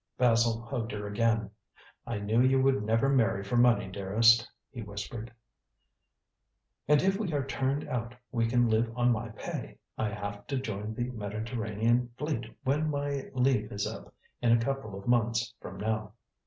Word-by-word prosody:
Basil 115 -2 +3
hugged 120 -2 -3
her 105 0 -4
again. 110 0 +1 0.6
"I 115 - -2
knew 105 +3 +2
you 130 +1 +4
would 135 -3 +3
never 115 +5 +2
marry 115 -7 +2
for 100 +5 -2
money, 120 -3 +4
dearest," 110 +5 +4 0.2
he 120 - -7
whispered. 105 +3 -6 1.6
"And 150 0 +5
if 195 +1 +2
we 200 -6 -1
are 140 -2 0
turned 135 +1 -1
out 120 -1 -3 0.2
we 115 -1 +1
can 120 +1 +3
live 115 +1 +2
on 125 0 +3
my 115 0 -1
pay. 110 - -6 0.2
I 110 - +1
have 100 0 -6
to 140 - -1
join 110 -3 -4
the 120 +2 -2
Mediterranean 110 +2 -1
Fleet 150 -6 -2 0.2
when 150 +4 +1
my 140 -1 -2
leave 130 0 +2
is 100 0 -2
up - - -6 0.3
in 120 -1 +3
a 115 - +7
couple 115 -5 -3
of 100 - -10
months 115 -1 +2
from - - -9
now. 110 0 -2
115 Hz, 170 wpm, -30 LUFS, 110-130 Hz, 1.6 s, a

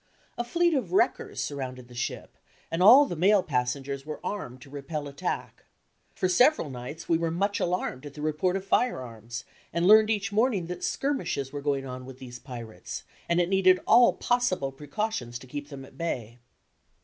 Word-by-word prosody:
A 240 - -2
fleet 340 +8 +2
of 275 +4 -1
wreckers 370 -2 +1
surrounded 130 -3 -5
the 125 - -14
ship, 120 0 -4 0.4
and 165 +2 -1
all 250 +9 +9
the 175 - -4
male 190 +4 +4
passengers 135 +1 -2
were 155 +1 -6
armed 130 -12 -4
to 135 - -15
repel 145 +1 -5
attack. 140 0 -4 0.5
For 185 - +1
several 215 - +4
nights 130 +6 -7
we 165 -1 +2
were 165 0 0
much 200 +5 0
alarmed 170 -6 -2
at 140 - -12
the 150 - -7
report 155 +4 0
of 195 0 -3
firearms, 120 - -1 0.3
and 170 +1 0
learned 215 +2 +7
each 200 -2 0
morning 215 -4 +2
that 180 +1 -6
skirmishes 170 - -1
were 145 - -4
going 140 -1 -1
on 130 0 -7
with 130 -1 -10
these 125 -2 -9
pirates, 120 -7 -8 0.3
and 170 +1 +3
it 175 - +3
needed 185 -1 +4
all 240 0 +6
possible 240 - 0
precautions 145 - -4
to 125 - -13
keep 145 +2 -7
them 135 -2 -8
at - - -18
bay. 120 -8 -3
155 Hz, 185 wpm, -27 LUFS, 130-195 Hz, 0.5 s, all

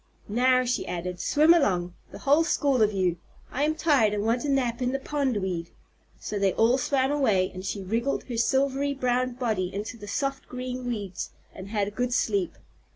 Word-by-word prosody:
"Now," 255 +4 +3
she 245 - -1
added, 180 0 -4
"swim 310 +3 +5
along, 180 - +1 0.2
the - - -10
whole 290 +4 +3
school 280 -6 +1
of 215 -1 +4
you! 185 -4 0 0.3
I 270 - -3
am 310 +1 0
tired 275 -10 +3
and 205 - -1
want 235 +2 +1
a 295 - -2
nap 255 -3 0
in 250 +1 0
the 270 - -1
pondweed." 205 - -2 0.5
So 205 - -4
they 195 -2 +2
all 235 +4 +3
swam 265 0 +1
away, 215 -11 +2
and 185 0 -7
she 195 0 -4
wriggled 230 +8 -1
her 240 -3 -5
silvery 275 +3 +1
brown 255 -1 0
body 220 -7 -1
into 210 +5 -5
the 205 -2 -10
soft 275 +5 -2
green 250 0 -5
weeds 205 -6 -4 0.2
and 190 0 -9
had 205 -2 0
a - - -14
good 245 +3 -1
sleep. 200 -5 0
245 Hz, 195 wpm, -26 LUFS, 200-270 Hz, 0.5 s, swim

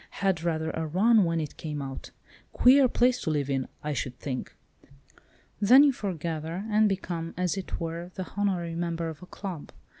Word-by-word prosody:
Had 190 -4 +2
rather 160 -1 -1
a 160 0 -3
run 205 +5 +4
when 165 -1 0
it 150 -3 -5
came 150 -2 -5
out. 135 -1 -6 0.4
Queer 265 +1 +6
place 250 +1 +2
to - - -2
live 145 -3 0
in, 135 -1 -1 0.2
I 150 0 -2
should 125 -1 -4
think.' 130 -3 -5 1.0
Then 245 +7 +7
you 285 -2 +4
foregather, 170 -3 -4
and 215 0 +4
become, 175 -4 -3
as 180 0 0
it 195 -2 -5
were, 170 +1 -4
the 185 - -5
honorary 185 -5 0
member 170 -1 -2
of 160 -2 -9
a 180 - -11
club. 185 -7 -7
170 Hz, 180 wpm, -27 LUFS, 160-195 Hz, 1.0 s, Then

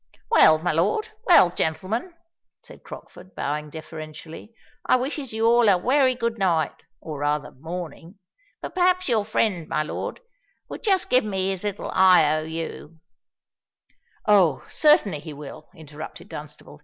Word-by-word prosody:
"Well, 160 - +6
my 175 +3 -1
lord—well 335 - +3
gentlemen," 195 - -3 0.5
said - - -14
Crockford, 185 - -13
bowing 150 +1 -3
deferentially; 155 +4 -10 0.3
"I - - +3
wishes 265 +1 -3
you 220 +1 -1
all 235 -1 +5
a 190 - +5
wery 255 +5 +2
good 235 -2 -3
night—or 160 -3 -2
rather 145 0 -1
morning. 165 +4 -8 0.5
But - - -6
perhaps 365 0 +2
your 225 -5 +2
friend, 200 -6 -1
my 155 - -1
lord, 150 - -5 0.5
would - - -7
just 385 -4 +1
give 255 - +4
me 190 -2 -2
his 190 0 -5
little 205 -1 -4
I. 180 -5 +5
O. 155 - -1
U.——" 160 0 -7 1.3
"Oh! 185 -9 +3
certainly, 220 - +3
he 155 0 -9
will" 145 -1 -11
interrupted 155 -1 -10
Dunstable. 150 0 -10
180 Hz, 140 wpm, -24 LUFS, 155-230 Hz, 1.3 s, Well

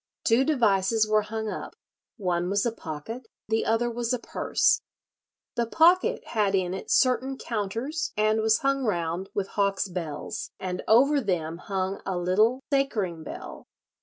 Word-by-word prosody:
Two 230 +3 +4
devices 220 -6 +2
were 215 0 +3
hung 220 +1 -4
up; - - -5 0.4
one 180 -4 -1
was 200 +2 +1
a 235 - +1
pocket, 225 - -7 0.2
the 220 +1 +1
other 225 +2 +2
was 235 0 -2
a - - +1
purse. 235 - +1 0.7
The 235 -1 -1
pocket 345 +8 +4
had 205 -3 +1
in 185 -1 0
it 190 - -6
certain 260 +1 +2
counters, 230 +9 -3
and 215 +1 +2
was 220 0 +3
hung 275 0 +1
round 175 -3 -1
with 200 -1 -1
hawk's 200 -1 0
bells, 170 -5 -5
and 185 -1 -3
over 275 +6 +5
them 170 -6 -2
hung 190 0 -3
a 190 - -2
little 215 +9 +2
sacring[63:1] 210 - 0
bell. - - -8
215 Hz, 155 wpm, -26 LUFS, 190-240 Hz, 0.7 s, over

